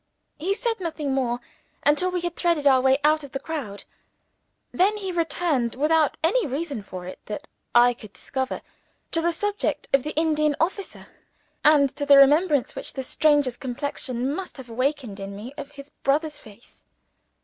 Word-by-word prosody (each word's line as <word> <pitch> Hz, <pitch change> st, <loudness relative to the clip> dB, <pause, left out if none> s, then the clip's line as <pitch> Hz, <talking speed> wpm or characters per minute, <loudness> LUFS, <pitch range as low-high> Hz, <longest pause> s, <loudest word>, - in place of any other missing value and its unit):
He 380 Hz, +6 st, 0 dB
said 465 Hz, -1 st, -2 dB
nothing 310 Hz, -6 st, -3 dB
more, 245 Hz, -2 st, 0 dB, 0.5 s
until 300 Hz, +5 st, +3 dB
we 360 Hz, -1 st, -2 dB
had 345 Hz, -1 st, -3 dB
threaded 335 Hz, -4 st, +1 dB
our 265 Hz, -2 st, +6 dB
way 265 Hz, +1 st, +4 dB
out 305 Hz, 0 st, +3 dB
of 280 Hz, -, -11 dB
the 270 Hz, -, -2 dB
crowd. 270 Hz, -10 st, -5 dB, 0.9 s
Then 405 Hz, +4 st, +2 dB
he 385 Hz, -3 st, -3 dB
returned, 320 Hz, -7 st, 0 dB
without 305 Hz, +2 st, +2 dB
any 405 Hz, +6 st, +2 dB
reason 280 Hz, -3 st, -3 dB
for 185 Hz, -2 st, -8 dB
it 185 Hz, -, -8 dB
that 285 Hz, +8 st, -6 dB, 0.3 s
I 245 Hz, +1 st, +7 dB
could 215 Hz, -4 st, -13 dB
discover, 260 Hz, +4 st, -4 dB, 0.5 s
to 330 Hz, -, +2 dB
the 340 Hz, +1 st, +2 dB
subject 410 Hz, +5 st, -2 dB
of 275 Hz, -, +5 dB
the 300 Hz, +4 st, -5 dB
Indian 305 Hz, -2 st, +2 dB
officer, 380 Hz, +4 st, -2 dB, 0.6 s
and 285 Hz, -3 st, +5 dB
to 285 Hz, -, -2 dB
the 280 Hz, -1 st, +8 dB
remembrance 290 Hz, 0 st, +5 dB
which -, -, -4 dB
the 265 Hz, -, -4 dB
stranger's 290 Hz, -2 st, +2 dB
complexion 260 Hz, 0 st, -3 dB
must 370 Hz, 0 st, -6 dB
have 250 Hz, -3 st, -10 dB
awakened 255 Hz, -4 st, -2 dB
in 195 Hz, 0 st, -6 dB
me 225 Hz, +7 st, -8 dB
of 290 Hz, -1 st, -7 dB
his 280 Hz, 0 st, -11 dB
brother's 295 Hz, +2 st, 0 dB
face. 215 Hz, -1 st, -14 dB
290 Hz, 170 wpm, -24 LUFS, 255-325 Hz, 0.9 s, the